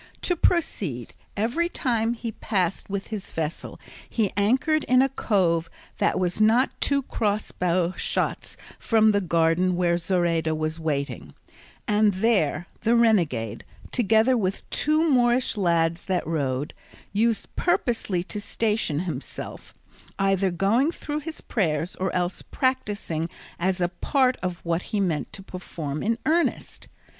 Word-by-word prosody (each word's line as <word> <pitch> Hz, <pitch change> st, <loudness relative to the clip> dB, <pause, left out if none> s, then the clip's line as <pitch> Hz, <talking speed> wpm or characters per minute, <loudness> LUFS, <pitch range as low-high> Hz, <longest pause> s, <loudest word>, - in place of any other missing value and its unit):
To 355 Hz, -, +1 dB
proceed: 190 Hz, -, 0 dB, 0.2 s
every 245 Hz, +12 st, +1 dB
time 235 Hz, -6 st, 0 dB
he 230 Hz, -1 st, -5 dB
passed 190 Hz, -4 st, -2 dB
with 195 Hz, 0 st, -4 dB
his 215 Hz, -3 st, -5 dB
vessel 160 Hz, 0 st, -4 dB, 0.3 s
he 215 Hz, -5 st, 0 dB
anchored 260 Hz, -, +2 dB
in 255 Hz, +1 st, +5 dB
a 270 Hz, -, +1 dB
cove 175 Hz, -10 st, +1 dB, 0.3 s
that -, -, +2 dB
was 180 Hz, +3 st, 0 dB
not 230 Hz, +5 st, +4 dB
two 280 Hz, -1 st, +2 dB
crossbow 185 Hz, -6 st, 0 dB
shots -, -, -2 dB, 0.2 s
from 220 Hz, -1 st, +4 dB
the 205 Hz, -1 st, +2 dB
garden 170 Hz, +1 st, +2 dB
where 175 Hz, -1 st, +2 dB
Zoraida 170 Hz, -3 st, +1 dB
was 155 Hz, +1 st, -2 dB
waiting; 140 Hz, -, -3 dB, 0.5 s
and 210 Hz, -1 st, +3 dB
there 190 Hz, -6 st, +2 dB
the 230 Hz, +1 st, +2 dB
renegade, 170 Hz, -, +2 dB, 0.3 s
together 225 Hz, +2 st, +3 dB
with 195 Hz, -4 st, -1 dB
the -, -, -33 dB
two 310 Hz, +2 st, +2 dB
Moorish 245 Hz, -3 st, +3 dB
lads 170 Hz, -4 st, +1 dB
that 185 Hz, -2 st, 0 dB
rowed, 145 Hz, -3 st, -1 dB, 0.4 s
used 225 Hz, +1 st, 0 dB
purposely 225 Hz, -, 0 dB
to 205 Hz, +2 st, -5 dB
station 210 Hz, -9 st, -1 dB
himself, 180 Hz, -2 st, -6 dB, 0.5 s
either 195 Hz, -1 st, +2 dB
going 205 Hz, -, +2 dB
through 300 Hz, -3 st, -4 dB
his 315 Hz, +1 st, -7 dB
prayers, 165 Hz, -5 st, -1 dB
or 190 Hz, 0 st, -1 dB
else 180 Hz, 0 st, -1 dB
practising 205 Hz, -, -1 dB, 0.3 s
as 185 Hz, +1 st, 0 dB
a 175 Hz, -, +2 dB
part 255 Hz, +8 st, +1 dB, 0.3 s
what 170 Hz, 0 st, 0 dB
he 210 Hz, -, -3 dB
meant 170 Hz, -6 st, -1 dB
to 195 Hz, -, -8 dB
perform 160 Hz, -6 st, -5 dB
in 230 Hz, +2 st, 0 dB
earnest. 335 Hz, +2 st, 0 dB
195 Hz, 135 wpm, -25 LUFS, 170-230 Hz, 0.5 s, in